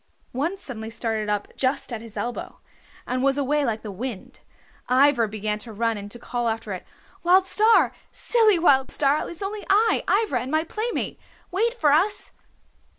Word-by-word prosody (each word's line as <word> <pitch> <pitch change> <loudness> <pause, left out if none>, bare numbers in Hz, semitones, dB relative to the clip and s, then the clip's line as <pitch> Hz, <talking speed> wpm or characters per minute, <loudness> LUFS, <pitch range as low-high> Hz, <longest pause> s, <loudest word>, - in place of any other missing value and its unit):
One 310 +10 -2
suddenly 225 - -5
started 225 -2 -2
up 205 -1 -2
just 265 -1 -1
at 225 - -4
his 225 -2 -11
elbow, 240 0 -5 0.5
and 255 0 -2
was 275 +1 +2
away 290 +1 +1
like 225 -4 -2
the 210 - -6
wind. 220 +1 -7 0.5
Ivra 255 -2 +4
began 210 0 -3
to 230 - -8
run 225 +1 0
and 205 0 -7
to 240 - -9
call 240 0 -2
after 220 -2 -3
it. 185 - -8 0.3
"Wild 370 +2 +5
Star! 435 +4 +4 0.2
Silly 445 -5 +3
Wild 275 -6 +4
Star! 285 +1 +1
It's 345 +3 -5
only 410 +1 -4
I, 435 +3 +3 0.2
Ivra, 255 - -1
and 255 - -5
my 315 +2 +1
playmate. 435 +8 -3 0.3
Wait 455 +6 +1
for 305 -11 +3
us!" 375 +8 +1
265 Hz, 175 wpm, -24 LUFS, 225-350 Hz, 0.5 s, Wild